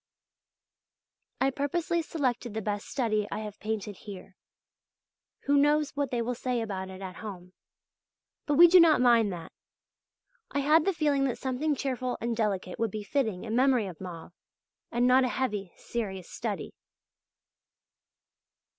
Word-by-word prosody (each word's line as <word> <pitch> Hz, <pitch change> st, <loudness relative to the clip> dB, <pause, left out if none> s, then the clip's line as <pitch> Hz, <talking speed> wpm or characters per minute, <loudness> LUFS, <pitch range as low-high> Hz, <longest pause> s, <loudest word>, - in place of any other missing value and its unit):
I 270 Hz, +1 st, +2 dB
purposely 330 Hz, +5 st, -1 dB
selected 250 Hz, -8 st, -2 dB
the 220 Hz, -, -1 dB
best 205 Hz, 0 st, -3 dB
study 215 Hz, -5 st, 0 dB
I 215 Hz, -, -3 dB
have 210 Hz, -1 st, -8 dB
painted 210 Hz, -2 st, -4 dB
here; 195 Hz, -2 st, -10 dB, 1.1 s
who 285 Hz, 0 st, +2 dB
knows 295 Hz, +1 st, +3 dB
what 285 Hz, -2 st, -2 dB
they 240 Hz, -1 st, -1 dB
will 245 Hz, +2 st, -1 dB
say 250 Hz, 0 st, -2 dB
about 190 Hz, -4 st, -4 dB
it 190 Hz, +1 st, -9 dB
at 185 Hz, -2 st, -7 dB
home; 185 Hz, -4 st, -8 dB, 0.9 s
but 295 Hz, -, +2 dB
we 340 Hz, +4 st, +10 dB
do 365 Hz, +2 st, +7 dB
not 330 Hz, -2 st, +6 dB
mind 235 Hz, -4 st, +4 dB
that. 170 Hz, -2 st, -7 dB, 1.0 s
I 280 Hz, -, -1 dB
had 305 Hz, +3 st, +4 dB
the 390 Hz, -, +3 dB
feeling 290 Hz, -4 st, +1 dB
that 255 Hz, -, -1 dB
something 270 Hz, +3 st, -1 dB
cheerful 255 Hz, -2 st, -2 dB
and 235 Hz, 0 st, -2 dB
delicate 200 Hz, -5 st, -2 dB
would 230 Hz, -1 st, +1 dB
be 210 Hz, +1 st, -5 dB
fitting 215 Hz, -4 st, -1 dB
in 225 Hz, 0 st, -3 dB
memory 255 Hz, -3 st, +3 dB
of 185 Hz, -3 st, -9 dB
Mauve, 175 Hz, -2 st, -8 dB, 0.6 s
and 240 Hz, +1 st, +2 dB
not 255 Hz, +1 st, +5 dB
a -, -, +2 dB
heavy, 210 Hz, -8 st, -2 dB
serious 195 Hz, -6 st, -5 dB
study. -, -, -4 dB
235 Hz, 155 wpm, -29 LUFS, 205-275 Hz, 1.1 s, we